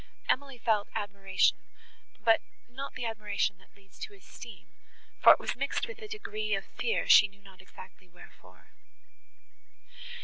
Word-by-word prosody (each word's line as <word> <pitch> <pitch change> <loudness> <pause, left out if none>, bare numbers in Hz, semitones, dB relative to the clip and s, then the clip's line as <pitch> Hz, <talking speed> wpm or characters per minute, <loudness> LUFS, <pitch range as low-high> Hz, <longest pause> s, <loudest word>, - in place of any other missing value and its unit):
Emily 275 -1 0
felt 220 -3 +1
admiration, 195 -2 +1 0.7
but 225 -1 +5 0.3
not 270 +3 -7
the 245 - -4
admiration 210 -3 -1
that - - -24
leads 195 -1 -21
to 435 -2 -7
esteem; 395 - -12 0.6
for - - +10
it - - -3
was - - -3
mixed - - -1
with 475 0 -9
a 430 - -7
degree 430 0 -3
of - - -4
fear 465 - -2
she 205 - +8
knew 200 0 -24
not 190 -1 -15
exactly 185 0 -15
wherefore. 175 0 -18
225 Hz, 145 wpm, -30 LUFS, -, 0.7 s, for